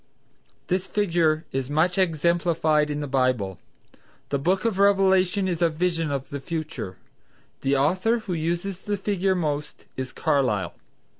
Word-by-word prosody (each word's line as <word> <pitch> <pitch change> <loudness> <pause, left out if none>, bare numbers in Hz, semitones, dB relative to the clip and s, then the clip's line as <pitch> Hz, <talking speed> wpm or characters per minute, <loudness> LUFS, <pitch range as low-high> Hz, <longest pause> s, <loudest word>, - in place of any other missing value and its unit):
This 185 +1 -1
figure 170 -6 +1
is 135 0 -2
much 170 +5 +2
exemplified 165 -3 +2
in 150 0 -2
the 145 - -3
Bible. 125 -8 0 0.7
The 140 - 0
book 185 +8 +1
of 215 -4 0
Revelation 195 -1 +3
is 175 -2 -2
a 170 - +4
vision 165 0 -1
of 140 -2 -4
the 140 - -3
future. 155 - -5 0.6
The 135 +1 +2
author 185 - +2
who 215 -5 -5
uses 175 +3 -2
the 205 -1 -2
figure 195 -1 0
most 150 -4 -3
is 130 0 -4
Carlyle. 125 -10 0
165 Hz, 145 wpm, -25 LUFS, 145-185 Hz, 0.7 s, a